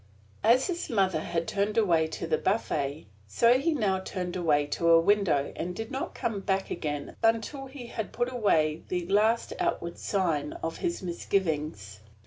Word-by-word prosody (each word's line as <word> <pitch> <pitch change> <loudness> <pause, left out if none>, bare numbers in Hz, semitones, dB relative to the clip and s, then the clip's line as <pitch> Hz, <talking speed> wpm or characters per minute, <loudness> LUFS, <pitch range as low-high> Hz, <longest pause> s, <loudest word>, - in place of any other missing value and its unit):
As 235 +4 +5
his 350 -2 -3
mother 190 -7 +2
had 165 +1 -2
turned 205 +2 -1
away 170 -7 +3
to 160 - -5
the 160 -1 0
buffet, 150 - -1 0.2
so 235 - +4
he 330 +5 +1
now 205 -10 +1
turned 180 -1 -4
away 155 -5 +2
to 170 +3 0
a 165 0 +8
window, 185 -6 +2
and 180 +2 -4
did 225 +2 -5
not 265 - -4
come 215 -3 -2
back 195 0 -1 0.5
until 230 +5 +1
he 265 -2 -9
had 220 -2 -5
put 245 +1 -2
away 160 -9 +2
the 180 -1 -2
last 215 +5 +2
outward 170 0 -2
sign 165 -7 0
of 165 0 -3
his 345 - -2
misgivings. 155 - -2
190 Hz, 165 wpm, -28 LUFS, 165-225 Hz, 0.5 s, a